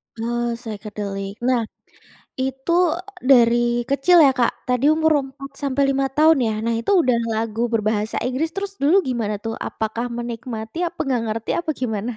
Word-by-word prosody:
Oh, 235 +1 -2
psychedelic. 205 -3 -6
Nah, 245 -3 +1 0.7
itu, 265 +4 -2 0.5
e - - -16
dari 235 -2 +6 0.3
kecil 340 +6 +4
ya, 275 - +6
Kak, 240 - 0
tadi 250 +2 +1
umur 315 0 +3
4 275 +1 -10
sampai 280 0 0
5 275 0 +1
tahun 315 -1 +5
ya. - - 0
Nah, 230 0 0
itu 320 - -3
udah 250 -7 +2
lagu 225 +1 -1
berbahasa 215 0 0
Inggris, 270 +6 -1
terus 390 +3 -5
dulu 315 +7 +5
gimana 225 -4 -1
tuh. 225 - -3
Apakah 230 +2 -4
menikmati, 235 +1 -6
apa 345 - -25
enggak 250 -3 0
ngerti, 225 +1 -3
apa 320 - -3
gimana? 220 -1 -2
240 Hz, 165 wpm, -21 LUFS, 225-275 Hz, 0.7 s, dari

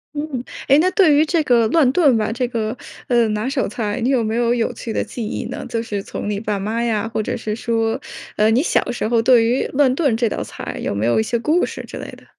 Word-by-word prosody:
嗯， 290 -4 -4 0.2
诶， 280 +1 +6
那 370 +3 +3
对 365 -7 +4
于 300 - +5
这 325 0 +1
个 235 -4 +3
乱 295 -2 +4
炖 285 -10 +4
吧， 215 +1 -1
这 250 +1 -1
个， 225 0 -3 0.3
呃， 235 -3 +3
拿 210 +3 -2
手 270 0 0
菜， 215 +1 -3
你 250 - +1
有 260 -4 +2
没 220 0 -1
有 240 0 +2
有 235 -2 -1
趣 230 - -6
的 - - -1
记 235 - -6
忆 210 - -4
呢？ - - -6
就 230 - -1
是 205 -3 -4
从 205 - -5
你 205 - -1
爸 210 -2 -2
妈 225 +4 -2
呀， 225 -2 0
或 215 - 0
者 - - -3
是 215 -1 -3
说， 225 -1 -1 0.4
呃， 215 +1 +3
你 245 +5 +3
小 275 - +1
时 235 - -2
候 230 -1 +2
对 235 -1 +5
于 245 +3 +1
乱 265 -2 +2
炖 275 -9 +1
这 235 -1 +1
道 - - -3
菜 - - -7
有 - - -1
没 105 +2 -1
有 120 - +2
一 220 - +3
些 235 +1 -1
故 315 +8 +2
事 - - -7
之 - - -10
类 - - -7
的？ - - -15
235 Hz, 285 characters per minute, -20 LUFS, 220-260 Hz, 0.4 s, 诶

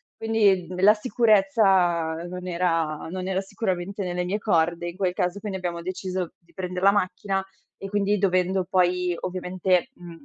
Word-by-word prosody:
Quindi 205 -6 +2
d 180 0 -7
la 210 +2 +8
sicurezza 195 -7 +3
non 180 0 -7
era 165 -4 -1
non 185 0 -4
era 190 0 0
sicuramente 195 -1 -3
nelle 180 0 -2
mie 200 +4 -1
corde, 170 -3 +1
in 175 - -6
quel 185 -2 0
caso 180 +2 -1
quindi 200 -3 -4
abbiamo 170 -2 -3
deciso 185 -1 -4
di 170 0 -28
prender 180 0 -4
la 195 - +6
macchina 195 0 -1 0.4
e 195 - -6
quindi 205 +1 +1
dovendo 185 -1 +1
poi, 180 -1 +2
ovviamente, 185 +3 0
mhmm, 170 -4 -12
185 Hz, 165 wpm, -25 LUFS, 175-195 Hz, 0.4 s, la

